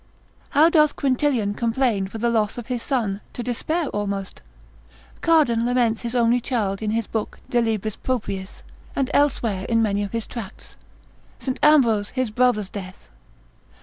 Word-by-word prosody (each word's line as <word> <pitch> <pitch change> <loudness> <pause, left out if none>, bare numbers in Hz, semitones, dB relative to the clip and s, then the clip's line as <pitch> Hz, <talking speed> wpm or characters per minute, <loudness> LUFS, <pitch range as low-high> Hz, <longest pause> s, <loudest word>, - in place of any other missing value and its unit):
How 300 +3 +5
doth 305 -3 +4
Quintilian 255 -6 +1
complain 230 -3 0
for 210 - -8
the 235 +1 +1
loss 220 -1 0
of 240 - -5
his 245 -2 -3
son, 220 -8 -1
to 245 - -4
despair 310 +8 -1
almost: 200 -1 -4 0.8
Cardan 295 -9 +3
lament 240 -2 +1
his 235 +1 -4
only 240 0 +3
child 220 -6 -2
in 215 - -1
his 225 +1 0
book 220 0 -4
de 240 -2 +3
libris 220 -2 -1
propriis, 200 -7 -4 0.3
and 270 -2 0
elsewhere 230 -9 +1
in 230 -1 +3
many 205 -1 0
of 205 - -3
his 230 -1 -2
tracts, 225 -6 -9 0.6
St. 260 -2 -4
Ambrose 235 -9 +4
his 255 -3 -2
brother's 220 -4 +2
death? 185 -2 -9
230 Hz, 155 wpm, -23 LUFS, 210-255 Hz, 0.8 s, How